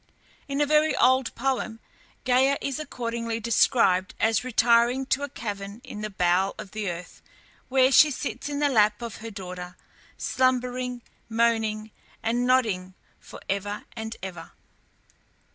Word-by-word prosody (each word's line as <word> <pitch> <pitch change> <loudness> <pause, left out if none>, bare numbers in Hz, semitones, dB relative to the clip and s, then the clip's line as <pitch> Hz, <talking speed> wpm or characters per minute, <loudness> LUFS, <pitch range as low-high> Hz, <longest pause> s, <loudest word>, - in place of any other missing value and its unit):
In 280 0 -2
a - - +4
very 305 +1 +3
old 260 0 +3
poem 240 -3 -2 0.5
Gæa 260 +2 +3
is 275 0 -3
accordingly 230 -5 -3
described 210 -5 +2
as 225 0 +2
retiring 240 +1 +3
to 270 +1 0
a 285 - -3
cavern 205 -3 -6
in 210 - -8
the 215 - -3
bowels 185 0 +1
of 210 -3 -9
the 215 -3 -3
earth, 175 +1 -8 0.5
where 260 0 +4
she 300 +3 +7
sits 250 -1 -4
in 290 - -3
the 290 0 +2
lap 215 -3 +3
of 230 -3 -6
her 225 - -7
daughter, 180 -3 -8 0.4
slumbering, 250 -1 0 0.3
moaning, 225 -2 +1 0.3
and 240 +2 0
nodding 205 -8 +1 0.2
for - - -12
ever 205 +1 -3
and 220 0 -5
ever. 175 -4 -8
230 Hz, 145 wpm, -26 LUFS, 205-255 Hz, 0.5 s, she